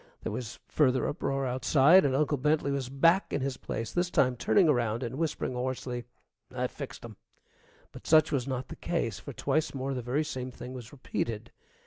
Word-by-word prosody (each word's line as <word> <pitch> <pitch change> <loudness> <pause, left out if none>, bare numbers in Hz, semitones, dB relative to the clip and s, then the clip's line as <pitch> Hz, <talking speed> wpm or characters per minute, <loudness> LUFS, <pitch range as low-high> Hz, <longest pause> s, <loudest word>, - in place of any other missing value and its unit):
There - - -3
was 120 -3 -5
further 130 -4 +2
uproar 135 -2 -1
outside, 135 +7 +5
and 135 -2 +2
Uncle 145 0 +1
Bentley 150 +1 +1
was 135 -3 -2
back 165 +8 +3
in 145 - -1
his 135 -1 -2
place, 115 -1 -4
this 175 0 0
time 130 -6 +2
turning 180 - +3
around 120 -4 +1
and 120 0 -4
whispering 160 -5 -1
hoarsely, 125 -1 -3 0.5
"I - - -2
fixed - - -7
'em!" - - -10 0.7
But - - -12
such 155 -1 +5
was 135 -3 0
not 130 -1 -3
the - - -7
case, - - -2
for - - -8
twice 155 -2 0
more 135 +1 -2
the 125 - -3
very 125 +6 0
same 130 -4 -4
thing 125 0 -9
was 125 -2 -9
repeated. 115 -4 -4
130 Hz, 190 wpm, -29 LUFS, 125-150 Hz, 0.7 s, outside